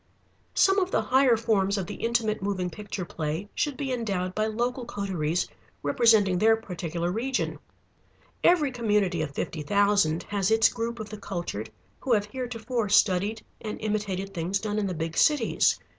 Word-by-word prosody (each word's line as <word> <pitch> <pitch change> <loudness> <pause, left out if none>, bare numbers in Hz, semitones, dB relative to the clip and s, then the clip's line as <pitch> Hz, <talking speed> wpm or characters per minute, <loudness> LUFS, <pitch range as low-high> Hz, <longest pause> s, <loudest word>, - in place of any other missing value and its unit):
Some 390 +1 +5
of 370 -1 0
the - - +1
higher 260 -2 +4
forms 205 -3 +1
of 190 - -2
the - - -6
Intimate 230 -3 0
Moving 190 -3 -2
Picture 200 0 -5
play 160 +4 -4
should 290 -3 -1
be 270 -3 -2
endowed 195 -7 -2
by 215 +2 0
local 240 +3 -2
coteries 180 -7 -2 0.4
representing 200 +3 +4
their 225 +2 +5
particular 175 -5 -4
region. 250 +6 -2 0.8
Every 315 -6 +4
community 210 -8 +1
of 155 - -2
fifty 160 - -3
thousand 200 -2 +2
has 200 -2 -1
its 225 0 +5
group 235 0 -4
of 215 -1 -6
the 215 - -7
cultured 170 - -4 0.3
who 255 - 0
have 205 -2 +2
heretofore 235 -1 -3
studied 205 +2 +3 0.2
and 215 -1 -5
imitated 200 -2 -2
things 180 +2 -1
done 210 +1 -2
in 205 - 0
the 185 - -3
big 165 0 -3
cities. 295 -7 +3
210 Hz, 165 wpm, -27 LUFS, 185-230 Hz, 0.8 s, Some